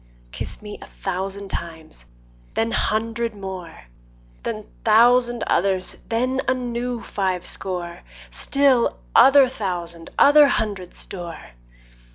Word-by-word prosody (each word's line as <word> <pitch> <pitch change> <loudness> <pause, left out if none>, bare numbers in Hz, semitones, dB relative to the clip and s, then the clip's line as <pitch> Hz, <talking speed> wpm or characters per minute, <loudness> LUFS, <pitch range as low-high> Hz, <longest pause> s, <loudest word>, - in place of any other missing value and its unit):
Kiss 60 - -2
me 210 -1 -8
a - - -10
thousand 195 +1 -4
times, 160 - -5 0.5
then 225 +1 0
hundred 225 +1 -1
more, 190 -4 -8 0.6
Then - - -5 0.2
thousand 240 0 +4
others, 185 0 +1
then 255 +3 0
a 260 - +3
new 245 -1 -3
five 185 -3 -2
score, 175 -2 -3 0.3
Still 260 - +2 0.2
other 270 +2 +7
thousand 175 -8 -4
other 290 +1 +7
hundred 200 -8 -2
store. 170 - -6
205 Hz, 110 wpm, -22 LUFS, 180-240 Hz, 0.6 s, other